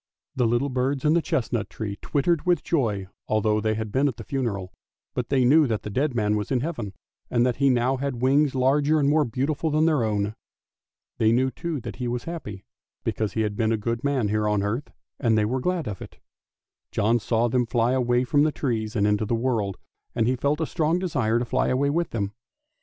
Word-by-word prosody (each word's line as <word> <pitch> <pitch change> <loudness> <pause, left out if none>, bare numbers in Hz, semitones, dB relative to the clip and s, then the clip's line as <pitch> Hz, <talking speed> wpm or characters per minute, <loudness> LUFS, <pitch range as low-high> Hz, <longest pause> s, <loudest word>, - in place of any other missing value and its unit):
The 125 -3 +2
little 120 +5 +1
birds 130 +2 -1
in 150 - +4
the 170 - +3
chestnut 120 -5 -1
tree 105 -3 -5
twittered 155 +2 +1
with 175 -4 +3
joy 110 - 0 0.2
although 110 0 +1
they 110 0 0
had 110 -1 -4
been 135 +5 +2
at 125 -5 -3
the 115 - -7
funeral, 105 -8 -3 0.4
but 125 -2 -3
they 130 -3 +3
knew 150 +3 +5
that 110 -3 -2
the 105 - -5
dead 135 +4 0
man 105 -2 +1
was 105 -1 -2
in 130 -3 +1
Heaven, 120 - -4 0.4
and 120 0 +2
that 125 -2 0
he 140 0 +3
now 125 +1 +2
had 135 -2 -3
wings 140 +2 +3
larger 145 +4 +3
and 140 - +2
more 150 +1 +3
beautiful 140 +6 -1
than 155 +1 +2
their 155 -7 +2
own. 105 -1 0 0.9
They 110 0 +4
knew, 130 +3 +2
too, 165 -1 -4
that - - -7
he 125 -1 -3
was 120 0 -2
happy, 105 - -7 0.4
because 110 -2 -2
he 110 - 0
had 105 -1 -1
been 110 +1 +1
a 115 - +2
good 115 +3 -3
man 135 -7 +1
here 105 0 +1
on 105 -1 +1
earth, 115 +8 -2 0.3
and 115 -4 +2
they 105 - +3
were 130 +5 -1
glad 175 -2 -1
of 100 -3 -5
it. - - -10 0.7
John 110 +3 +2
saw 115 +2 +1
them 125 0 +1
fly 120 0 +1
away 125 -1 +2
from 145 +3 +2
the 155 +1 +3
trees 115 -6 -2
out 105 -2 +2
into 105 0 +1
the 115 - +1
world, 115 -5 -1 0.4
and 115 - +2
he 130 - +2
felt 140 +4 0
a - - +1
strong 160 +1 0
desire 130 -11 0
to 120 - -1
fly - - 0
away 140 +2 +1
with 170 +2 0
them. 100 -3 -3
125 Hz, 225 wpm, -25 LUFS, 110-140 Hz, 0.9 s, knew